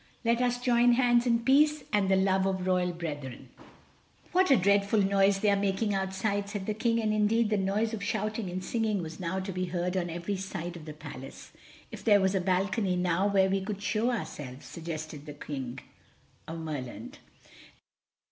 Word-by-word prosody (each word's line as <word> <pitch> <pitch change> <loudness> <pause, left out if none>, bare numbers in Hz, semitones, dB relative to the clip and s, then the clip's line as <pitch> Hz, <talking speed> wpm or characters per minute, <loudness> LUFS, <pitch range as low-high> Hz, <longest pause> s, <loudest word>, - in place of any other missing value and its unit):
Let 235 +1 +2
us 245 0 +1
join 245 -1 +4
hands 240 0 +3
in 230 -1 +2
peace 295 +4 +4
and 200 -2 +2
the 190 - +5
love 190 0 +2
of 190 -1 -1
royal 180 -1 +1
brethren." 145 -7 -6 0.8
"What 370 +1 +3
a 270 - +6
dreadful 200 +2 +3
noise 195 0 +3
they 210 - +4
are - - +4
making 200 +1 0
outside," 200 +1 -1
said 205 -2 -4
the 215 - -1
King, 230 +2 +1
and 215 -1 0
indeed 215 +1 +2
the 210 - +3
noise 205 +4 0
of 220 - -4
shouting 215 -1 -2
and 185 +1 -4
singing 215 -3 -1
was 160 0 -8
now 185 +1 -2
to 190 +1 -4
be 185 0 -2
heard 180 +1 -2
on 175 -2 -1
every 175 +4 -3
side 175 -2 -5
of 165 -3 -10
the 155 - -7
Palace. 145 -3 -10 0.4
"If - - -9
there 205 -3 +5
was 190 0 +2
a 190 - +1
balcony 190 +1 +1
now 180 +2 +1
where 195 -1 +3
we 195 0 0
could 205 +1 -5
show 215 +3 +1
ourselves," 145 - -5
suggested 155 -3 -7
the 150 - -6
King 135 -4 -6 0.7
of 165 - -5
Merland. 160 - -6
195 Hz, 190 wpm, -29 LUFS, 175-215 Hz, 0.8 s, a